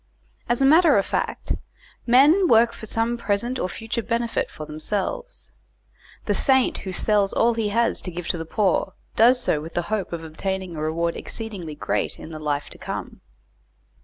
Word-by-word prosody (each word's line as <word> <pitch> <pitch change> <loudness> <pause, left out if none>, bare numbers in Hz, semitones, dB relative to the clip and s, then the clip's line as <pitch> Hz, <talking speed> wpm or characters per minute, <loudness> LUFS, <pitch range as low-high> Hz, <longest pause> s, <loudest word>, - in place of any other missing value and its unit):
As 240 +3 +2
a - - +5
matter 315 - +6
of 195 - +2
fact - - -2 0.5
men 295 +10 +6
work 230 -3 +5
for 220 - -9
some 230 +2 -1
present 235 +4 -1
or 180 - -1
future 225 +4 -4
benefit 230 0 -1
for 155 - -8
themselves. 195 - -3 0.7
The - - +1
saint 265 -2 +3
who 190 - -6
sells 200 +1 +1
all 235 +1 +3
he 225 -2 -1
has 230 +3 +1
to 180 - -5
give 175 0 -6
to 175 - -1
the - - -3
poor, 190 +1 0 0.2
does 245 +3 +5
so 150 - +1
with 160 +2 -9
the 175 - +1
hope 205 -4 -1
of 170 -1 -5
obtaining 185 +2 -4
a 155 - -5
reward 165 +2 -1
exceedingly 195 -9 -6
great - - -2
in 165 - -10
the 155 - -7
life 145 -1 -2
to - - -9
come. - - -6
205 Hz, 185 wpm, -23 LUFS, 170-235 Hz, 0.7 s, matter